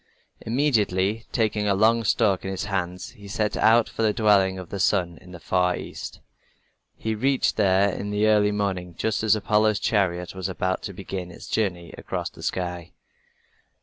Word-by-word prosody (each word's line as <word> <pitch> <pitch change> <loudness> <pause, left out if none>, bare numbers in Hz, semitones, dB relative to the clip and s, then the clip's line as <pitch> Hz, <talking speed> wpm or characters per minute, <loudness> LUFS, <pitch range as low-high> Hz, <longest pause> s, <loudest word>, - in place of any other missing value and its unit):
Immediately, 110 -5 +1
taking 110 -3 0
a 100 - +3
long 115 +3 +3
stalk 100 -2 +2
in 95 - -4
his 95 - -3
hands, 90 -3 -3
he 100 -1 -13
set 105 +1 -1
out 115 0 +4
for - - -6
the 110 -1 +3
dwelling 100 -4 +3
of 90 -2 -8
the 100 - -4
sun 90 -3 +1
in 90 -1 -15
the 90 - -9
far 90 +1 +1
east. - - -8 0.7
He 110 - -3
reached 130 +5 +1
there 100 -1 +3
in 100 +2 -5
the 105 +1 +1
early 105 -1 +4
morning, 95 -4 -2
just 110 -2 -1
as 110 -1 +4
Apollo's 110 0 +2
chariot 90 -6 0
was 95 0 -4
about 95 0 -1
to - - -8
begin 95 -1 -6
its 85 - -11
journey 90 -6 -2
across - - -4
the - - -14
sky. 90 -2 -4
100 Hz, 180 wpm, -24 LUFS, 90-110 Hz, 0.7 s, out